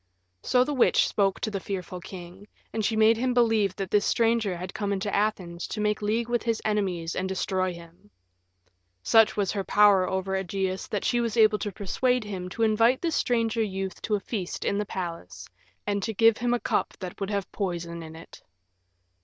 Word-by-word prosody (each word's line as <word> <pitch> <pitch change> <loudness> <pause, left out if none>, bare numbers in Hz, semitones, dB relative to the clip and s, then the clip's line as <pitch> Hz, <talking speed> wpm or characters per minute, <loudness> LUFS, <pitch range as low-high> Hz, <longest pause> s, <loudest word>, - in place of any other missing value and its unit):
So 250 - +3
the 295 - -3
witch 260 - +4
spoke 195 -2 +1
to 215 - -2
the 200 - -2
fearful 185 -2 -5
king, 185 +2 -10 0.3
and 220 - -1
she 220 - +1
made 220 +1 +5
him 250 +1 0
believe 225 -5 +3
that 195 -2 -5
this 205 -1 +3
stranger 225 -6 +1
had 185 +2 -7
come 205 -1 -2
into 200 +1 -2
Athens 185 -5 -1
to 215 - -5
make 210 0 0
league 220 +3 0
with 240 0 0
his 230 -1 -1
enemies 185 -6 -1
and 190 +1 -2
destroy 185 0 -1
him. 170 -9 -14 0.9
Such 225 - +4
was 200 -3 +1
her 200 -2 -2
power 200 -2 +4
over 190 0 -2
Ægeus 190 0 -2
that 205 - -2
she 240 - +2
was 235 -1 -2
able 215 -1 +5
to 205 - -3
persuade 245 +6 0
him 190 -3 -5
to 225 +5 -2
invite 225 +4 +3
the 335 - +1
stranger 230 -5 +1
youth 195 -3 -3
to 215 - 0
a - - -1
feast 195 -3 -4
in 200 - 0
the 210 - -2
palace, 170 - -6 0.4
and 205 -1 -1
to 220 +3 -3
give 225 +1 +4
him 245 +1 +1
a - - -2
cup - - -1
that 180 -2 -7
would 195 - -2
have 200 -2 -3
poison 170 -4 -4
in 160 0 -9
it. 165 - -13
205 Hz, 205 wpm, -26 LUFS, 185-225 Hz, 0.9 s, made